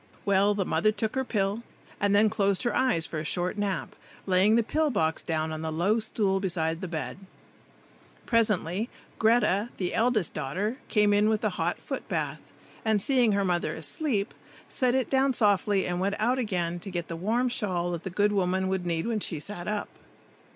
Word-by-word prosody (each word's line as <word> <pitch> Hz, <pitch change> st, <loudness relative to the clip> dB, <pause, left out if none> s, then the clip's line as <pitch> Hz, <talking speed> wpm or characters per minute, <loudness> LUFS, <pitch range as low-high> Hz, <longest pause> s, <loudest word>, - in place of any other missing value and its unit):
Well, 200 Hz, +1 st, +3 dB
the 195 Hz, -2 st, 0 dB
mother 215 Hz, +3 st, +2 dB
took 220 Hz, 0 st, -2 dB
her 265 Hz, -, 0 dB
pill, 205 Hz, -2 st, -1 dB, 0.4 s
and 205 Hz, 0 st, +2 dB
then 210 Hz, +2 st, +5 dB
closed 200 Hz, -3 st, +1 dB
her 240 Hz, -, 0 dB
eyes 245 Hz, -11 st, +2 dB
for 155 Hz, -, -4 dB
a -, -, -4 dB
short 175 Hz, +4 st, -1 dB
nap, 205 Hz, -2 st, -2 dB, 0.3 s
laying 190 Hz, +3 st, +4 dB
the 235 Hz, -, +3 dB
pill 310 Hz, +6 st, +1 dB
box 160 Hz, -, 0 dB
down 160 Hz, -1 st, -1 dB
on 155 Hz, 0 st, -4 dB
the 160 Hz, 0 st, -3 dB
low 185 Hz, +8 st, +2 dB
stool 200 Hz, -3 st, 0 dB
beside 165 Hz, -3 st, -1 dB
the 185 Hz, -, -3 dB
bed. 165 Hz, +2 st, -4 dB, 1.1 s
Presently 215 Hz, -3 st, +1 dB, 0.3 s
Greta, 220 Hz, -1 st, +3 dB
the 180 Hz, -2 st, -2 dB
eldest 225 Hz, -6 st, +2 dB
daughter, 200 Hz, -, -2 dB
came 210 Hz, -2 st, +3 dB
in 205 Hz, +1 st, +4 dB
with 220 Hz, -1 st, +1 dB
the -, -, 0 dB
hot -, -, -1 dB
foot -, -, -6 dB
bath, -, -, -3 dB, 0.3 s
and 220 Hz, -2 st, +2 dB
seeing 245 Hz, 0 st, +3 dB
her 200 Hz, 0 st, +1 dB
mother 175 Hz, -3 st, 0 dB
asleep, 200 Hz, -, -2 dB, 0.3 s
set 255 Hz, -1 st, +1 dB
it 260 Hz, -3 st, +1 dB
down 265 Hz, -1 st, +2 dB
softly 205 Hz, -2 st, +2 dB
and 175 Hz, 0 st, -2 dB
went 200 Hz, +2 st, 0 dB
out 245 Hz, +4 st, +1 dB
again 175 Hz, -7 st, -1 dB
to 195 Hz, -, -8 dB
get 175 Hz, -2 st, -4 dB
the 165 Hz, -, -5 dB
warm 225 Hz, +9 st, 0 dB
shawl 185 Hz, -7 st, -1 dB
that 170 Hz, -2 st, -3 dB
the 190 Hz, -, -5 dB
good 205 Hz, +3 st, +2 dB
woman 190 Hz, -1 st, +1 dB
would 190 Hz, -2 st, -2 dB
need 165 Hz, -1 st, -1 dB
when 230 Hz, -2 st, 0 dB
she 170 Hz, -6 st, -1 dB
sat 175 Hz, +2 st, -7 dB
up. 210 Hz, -1 st, -2 dB
200 Hz, 195 wpm, -27 LUFS, 175-220 Hz, 1.1 s, then